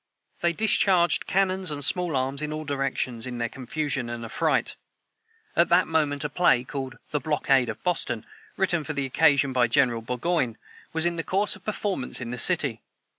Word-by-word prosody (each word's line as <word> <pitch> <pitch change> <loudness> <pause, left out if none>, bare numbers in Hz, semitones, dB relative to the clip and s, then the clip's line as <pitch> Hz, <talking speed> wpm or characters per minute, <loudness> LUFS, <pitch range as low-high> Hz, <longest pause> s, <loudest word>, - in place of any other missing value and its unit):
They 170 - +2
discharged 185 -2 +3
cannons 190 -1 +1
and 145 -2 -1
small 175 -3 0
arms 135 +2 -1
in 150 0 -3
all 155 0 -5
directions, 135 -4 -2
in 125 -1 -5
their 120 0 -1
confusion 135 0 -3
and 120 0 -5
affright. - - 0 0.8
At 170 - +3
that 180 +2 +4
moment 150 -3 0
a 150 - -2
play, 145 -6 +3
called 135 0 -6
"The 150 - 0
Blockade 135 -3 +1
of 110 - -7
Boston," 120 -10 -1 0.3
written 180 -4 +1
for 155 - -4
the 140 -2 -2
occasion 140 0 +3
by 125 -1 +3
General 120 -1 +2
Burgoyne, 125 0 -1 0.3
was 160 +1 +2
in 170 -1 0
course 195 +5 0
of 200 - -16
performance 205 -9 -2
in 120 -2 -5
the 125 - -4
city. - - +1
145 Hz, 180 wpm, -26 LUFS, 125-170 Hz, 0.8 s, that